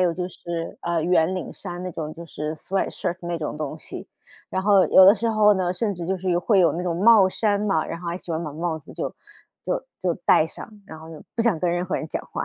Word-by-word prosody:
有 180 -2 +3
就 180 0 -3
是， 170 -2 -6
呃， 170 -1 0
圆 175 +1 +2
领 185 - -5
衫 175 0 -7
那 185 - -4
种， 155 -1 -5
就 170 - -9
是 155 0 -4
sweatshirt 180 0 -2
那 170 0 -3
种 150 -1 -4
东 150 -2 -4
西。 - - -9 0.4
然 190 - -1
后 200 -2 +5
有 190 - +8
的 195 - +8
时 230 +2 -1
候 210 -1 +5
呢， 180 -1 0
甚 205 +2 -1
至 175 -1 -6
就 190 +1 0
是 185 0 -2
有 175 - +2
会 195 +1 +3
有 170 - +4
那 175 - -3
种 175 -2 -1
帽 205 0 +6
衫 205 +1 0
嘛， 195 -7 +1
然 165 - -6
后 175 - -5
还 170 - -2
喜 175 - -10
欢 160 +1 -2
把 150 - -5
帽 160 +1 -2
子 145 - -14
就 - - -4 0.5
就 - - -2 0.2
就 180 -2 0
戴 155 - +5
上， 160 - -9 0.2
然 160 - -10
后 160 - -12 0.3
不 230 - +2
想 225 -8 +2
跟 175 +1 0
任 175 +1 -1
何 - - -2
人 155 - -4
讲 - - -4
话。 - - -2
175 Hz, 325 characters per minute, -24 LUFS, 165-190 Hz, 0.5 s, 有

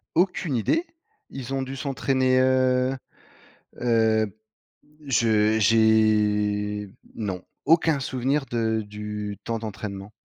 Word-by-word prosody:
Aucune 175 -5 +1
idée! 320 - +1 0.5
Ils 135 0 -5
ont 135 - -1
dû 135 +1 -6
s'entraîner, 130 -2 +1
heu 130 0 +2 0.9
heu, 110 -3 +1 0.7
je 110 -4 +3
j'ai, 105 -2 +2 0.2
non, 95 -5 -4 0.2
aucun 160 -1 +3
souvenir 135 +2 -1
de 110 -2 -1
du 105 0 -6
temps 115 -1 -3
d'entraînement. 100 -2 -7
115 Hz, 100 wpm, -25 LUFS, 105-130 Hz, 0.9 s, je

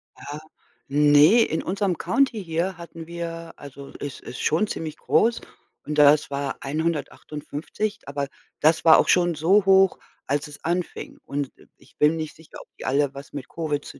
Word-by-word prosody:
Ah, 145 +2 -8 0.5
ne, 150 - +6
in 160 -6 -1
unserem 195 -2 -1
County 225 +3 +1
hier 170 +2 -2
hatten 165 -1 -10
wir 170 -1 -6
also 140 -1 -11
es 145 -2 -6
ist 125 - -9
schon 170 +8 +2
ziemlich 160 -5 -5
groß 230 +1 +2 0.4
und 150 0 -4
das 150 0 +5
war 140 -1 -3
158, 155 +5 -3
aber 140 0 -3 0.3
das 160 +2 +3
war 160 - +9
auch - - +3
schon 175 -2 +3
so 185 +6 +3
hoch, 195 0 +5 0.3
als 145 +2 -1
es 145 -1 -13
anfing. 175 +1 -3
Und, 140 -1 -4
äh, - - -20
ich - - -24
bin 150 +2 +4
nicht 155 -1 -5
sicher, 160 0 -14
ob - - -16
die - - -8
alle 140 +1 +1
was 140 +1 -10
mit 140 -3 -6
Covid 150 -3 -3
zu - - -11
160 Hz, 175 wpm, -24 LUFS, 145-175 Hz, 0.5 s, war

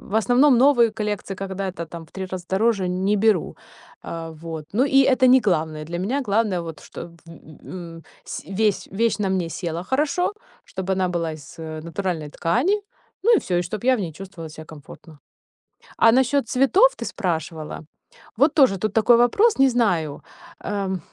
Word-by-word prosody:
В 200 - -9
основном 245 +4 +4
новые 245 -3 +5
коллекции, 210 -3 -4
когда 195 0 -4
это 170 -2 -7
там 165 0 -9
в - - -25
3 190 -1 -6
раза 185 -1 -6
дороже, 195 -1 +1
не 190 +3 0
беру. 210 -4 +1 0.5
Э, 165 -1 -6
вот. 160 -2 -6
Ну 245 +6 +3
и 270 -1 +4
это 260 -1 +4
не 255 +1 +6
главное. 160 -7 -1
Для 170 +2 -5
меня 255 +10 -1
главное 205 -3 +1
вот, 165 -2 -8
чтоб 170 - -9 0.2
в 165 - -13
ы - - -11 0.3
ы 170 -2 -9
ы - - -14 0.2
сь - - -7
весь 210 0 0
вещь 220 0 0
на 195 - 0
мне 185 -3 -1
села 170 -1 -4
хорошо, 300 - 0 0.3
чтобы 190 0 -4
она 185 -1 0
была 170 -2 -2
из, 145 -3 -13
э, 155 -1 -6
натуральной 170 -4 -3
ткани, 285 - +1 0.4
ну 465 +3 +5
и - - +4
всё. 180 - -3
И 175 - +1
чтоб 210 +6 -6
я 260 0 +4
в - - -4
ней 170 -5 -4
чувствовала 180 -2 -9
ся 155 +1 -10
комфортно. 155 0 -14 0.8
А 225 - +6
насчет 265 +1 +2
цветов 275 - +5
ты - - -5
спрашивала. 160 -5 -4 0.6
Вот 285 +4 +4
тоже 260 -10 +4
тут 215 +2 -2
такой 230 +1 +5
вопрос, 335 - +3
не 270 - +6
знаю. 180 - 0 0.4
Эм, 195 -3 -2
195 Hz, 190 wpm, -22 LUFS, 170-240 Hz, 0.8 s, не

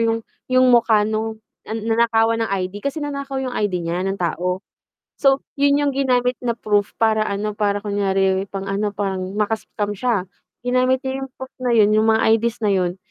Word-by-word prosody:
yung 225 -1 0 0.2
yung 255 0 +4
mukha 225 -3 +4
nung, 220 +1 -2 0.3
ah, 220 - -3
nanakawan 225 0 +2
ng 225 - 0
ID. 195 +1 -3
Kasi 280 +5 -3
nanakaw 280 -1 -4
'yong 265 -1 -2
ID 185 -7 -1
niya, 170 +2 -2
ng 195 +1 -1
tao. 180 +2 -2 0.6
So 270 -1 +3
yun 285 0 +3
yung 290 -1 +1
ginamit 250 -2 +1
na 235 -2 -1
proof 205 -3 0
para 220 -1 +3
ano, 210 0 -2
para 205 -1 0
kunyari 195 -1 +1
pang-ano, 195 +1 -2
parang 195 -1 -3
maka-scam 210 -1 -2
siya. 210 -3 0 0.4
Ginamit 255 +1 +2
niya 265 +1 -2
'yong 270 - -5
proof 260 0 -9
na 250 - 0
yun, 210 -1 +5
yung 215 +1 +3
mga 220 0 +3 0.2
ID's 235 +1 -2
na 205 - +3
yun. 180 -1 0
220 Hz, 185 wpm, -21 LUFS, 200-250 Hz, 0.6 s, yun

